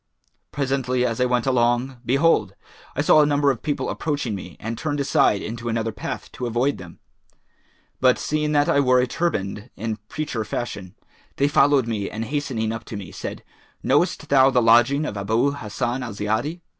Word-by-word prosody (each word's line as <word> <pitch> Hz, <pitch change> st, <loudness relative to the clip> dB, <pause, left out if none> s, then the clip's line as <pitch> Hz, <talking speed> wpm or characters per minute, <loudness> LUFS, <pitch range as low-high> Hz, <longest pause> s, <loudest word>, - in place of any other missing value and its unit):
Presently, 130 Hz, -3 st, 0 dB
as 115 Hz, 0 st, -1 dB
I -, -, +4 dB
went 125 Hz, -1 st, +1 dB
along, 125 Hz, 0 st, +1 dB
behold, 140 Hz, +7 st, +2 dB, 0.4 s
I -, -, +1 dB
saw 155 Hz, -, +6 dB
a -, -, +5 dB
number 145 Hz, -1 st, +3 dB
of 125 Hz, -, -5 dB
people 145 Hz, -, -2 dB
approaching 145 Hz, -7 st, -2 dB
me 90 Hz, -2 st, -8 dB
and 115 Hz, +2 st, -4 dB
turned 145 Hz, +2 st, -3 dB
aside 120 Hz, -7 st, +2 dB
into 115 Hz, +1 st, -5 dB
another 115 Hz, 0 st, -1 dB
path 105 Hz, -, -6 dB
to 125 Hz, -, -4 dB
avoid 120 Hz, +5 st, 0 dB
them; 90 Hz, -2 st, -11 dB, 1.0 s
but 130 Hz, -1 st, +4 dB
seeing 150 Hz, 0 st, -1 dB
that 145 Hz, 0 st, +3 dB
I 140 Hz, -, +3 dB
wore 130 Hz, -2 st, +4 dB
a 125 Hz, -, +3 dB
turband 115 Hz, -, -2 dB
in 110 Hz, +1 st, -3 dB
preacher 150 Hz, -7 st, -3 dB
fashion,[FN#419] 105 Hz, -4 st, -6 dB, 0.3 s
they 140 Hz, -, +2 dB
followed 145 Hz, -2 st, +4 dB
me 105 Hz, -4 st, -2 dB
and 110 Hz, +1 st, -4 dB
hastening 130 Hz, -6 st, -2 dB
up 115 Hz, 0 st, -5 dB
to 105 Hz, -, -6 dB
me, 95 Hz, -4 st, -8 dB
said, -, -, -7 dB, 0.4 s
'Knowest -, -, +1 dB
thou 135 Hz, -1 st, +6 dB
the 130 Hz, -, +3 dB
lodging 120 Hz, +6 st, +4 dB
of 105 Hz, -, -4 dB
Abu 110 Hz, +7 st, +1 dB
Hassan 120 Hz, 0 st, -3 dB
al 120 Hz, -4 st, -5 dB
Ziyadi?' 110 Hz, -, -2 dB
125 Hz, 180 wpm, -23 LUFS, 110-140 Hz, 1.0 s, saw